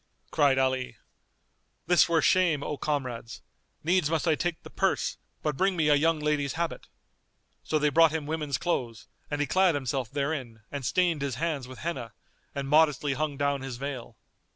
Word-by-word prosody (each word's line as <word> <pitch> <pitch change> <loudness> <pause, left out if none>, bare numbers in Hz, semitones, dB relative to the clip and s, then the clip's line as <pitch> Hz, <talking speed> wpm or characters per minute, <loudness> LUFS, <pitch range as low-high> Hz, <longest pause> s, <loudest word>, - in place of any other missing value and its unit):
Cried 140 -3 +3
Ali, 130 -3 0 0.9
"This 175 0 +5
were 165 -1 +3
shame, 170 -6 +3
O 150 - -3
comrades; 130 -6 -3 0.4
needs 175 -1 +2
must 165 +1 0
I 160 - +5
take 175 +2 -2
the - - -11
purse: - - 0 0.3
but 150 -2 0
bring 190 +4 +2
me 155 -2 +3
a - - +6
young 160 +3 +3
lady's 150 -2 0
habit." 170 0 -3 0.8
So 155 - 0
they 150 0 +2
brought 165 +2 +6
him 155 -2 -3
women's 150 -2 -2
clothes 120 -10 -2 0.2
and 145 - -2
he - - +2
clad 185 0 +3
himself 130 -3 -2
therein 140 -5 -3
and 145 -2 -4
stained 170 +3 +1
his 140 -3 -2
hands 150 -3 -2
with 130 - -10
Henna, 130 -9 -4 0.4
and 140 -1 -3
modestly 150 -1 +3
hung 150 0 -2
down 140 -1 0
his 135 -2 -5
veil. 135 -2 -6
145 Hz, 175 wpm, -28 LUFS, 135-160 Hz, 0.9 s, a